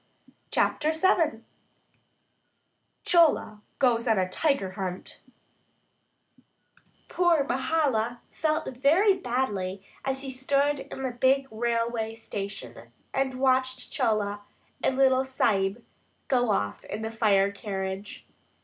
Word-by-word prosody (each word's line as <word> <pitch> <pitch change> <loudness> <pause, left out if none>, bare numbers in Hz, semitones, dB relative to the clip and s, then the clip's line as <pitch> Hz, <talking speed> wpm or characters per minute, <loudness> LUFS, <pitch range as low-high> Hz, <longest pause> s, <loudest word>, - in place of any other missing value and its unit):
CHAPTER 310 +1 +1
VII 320 -8 +2 1.6
CHOLA 310 -11 +3 0.2
GOES 240 -2 +2
ON 220 -2 +3
A 185 -1 +1
TIGER 275 -4 0
HUNT 185 -1 -6 1.9
POOR 345 -5 +3
Mahala 245 -4 0
felt 310 -4 -1
very 340 +10 +4
badly 205 - -2 0.2
as 270 0 -2
he 270 - -4
stood 275 +2 +1
in 270 - -7
the 260 - -1
big 260 +3 +2
railway 230 0 -1
station 195 - -7 0.2
and 270 -1 0
watched 260 -1 +1
Chola 205 -2 0 0.4
and 265 - +2
the 270 - +3
little 260 0 +4
Sahib 210 -5 0 0.4
go 245 -3 +2
off 100 - -1
in 215 - -5
the 220 - -3
fire 200 -3 +3
carriage. 195 -1 -5
245 Hz, 110 wpm, -27 LUFS, 205-270 Hz, 1.9 s, very